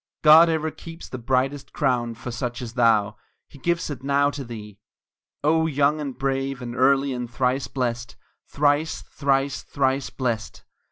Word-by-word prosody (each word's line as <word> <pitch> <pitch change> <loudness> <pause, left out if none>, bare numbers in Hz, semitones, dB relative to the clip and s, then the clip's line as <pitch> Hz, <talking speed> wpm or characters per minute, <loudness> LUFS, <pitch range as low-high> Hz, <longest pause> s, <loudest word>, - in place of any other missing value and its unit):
God 160 +2 +8
ever 160 -1 0
keeps 165 +2 -10
the 130 - -7
brightest 130 +3 -1
crown 120 -5 0
for 120 +2 -7
such 120 0 -4
as 120 -2 -6
thou 110 -4 +2 0.3
He 140 - -16
gives 170 +4 0
it 130 -3 -6
now 140 +1 +2
to 140 -1 -6
thee! 105 -4 -9 0.6
O 160 +2 +3
young 145 0 +1
and 135 -4 -5
brave, 135 -1 -1
and 120 -2 -6
early 135 +1 +3
and 125 -1 -4
thrice 125 +1 0
blest 120 -3 -3 0.3
Thrice, 145 +2 +1
thrice, 135 -1 0
thrice 135 -1 -1
blest! 120 -4 -3
135 Hz, 160 wpm, -24 LUFS, 120-145 Hz, 0.6 s, God